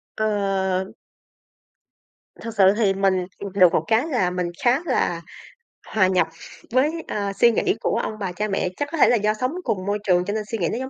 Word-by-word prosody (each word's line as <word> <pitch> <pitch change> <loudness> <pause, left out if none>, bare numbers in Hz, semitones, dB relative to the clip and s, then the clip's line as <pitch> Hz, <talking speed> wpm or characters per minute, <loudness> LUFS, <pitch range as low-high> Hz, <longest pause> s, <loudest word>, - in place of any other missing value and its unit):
Ờ. 195 -3 0 1.6
Thực 230 -1 -7
sự 195 -1 +5
thì 205 -4 +2
mình 190 -2 +1
ừ, 200 - -5
được 185 -4 +5
một 155 - +2
cái 225 +5 +2
là 245 - +1
mình 180 -1 -3
khá 245 +2 +4
là 175 - 0 0.7
hòa 190 -4 +2
nhập 185 -1 +2 0.4
với, 260 +5 +3 0.2
ờ, 200 -1 -3
suy 235 +4 +4
nghĩ 380 - +1
của - - 0
ông - - -3
bà, 190 -3 -3
cha 210 +4 -3
mẹ. 195 -2 -1
Chắc 290 - -2
có 330 - -3
thể - - +5
là - - +4
do 210 -1 +1
sống 255 +4 -2
cùng 185 - -2
môi 205 +1 -1
trường 180 -2 +2
cho 205 - -2
nên 215 0 -2
suy 225 - -1
nghĩ 175 -5 0
nó - - -3
giống 260 +1 -5
205 Hz, 215 wpm, -22 LUFS, 185-230 Hz, 1.6 s, sự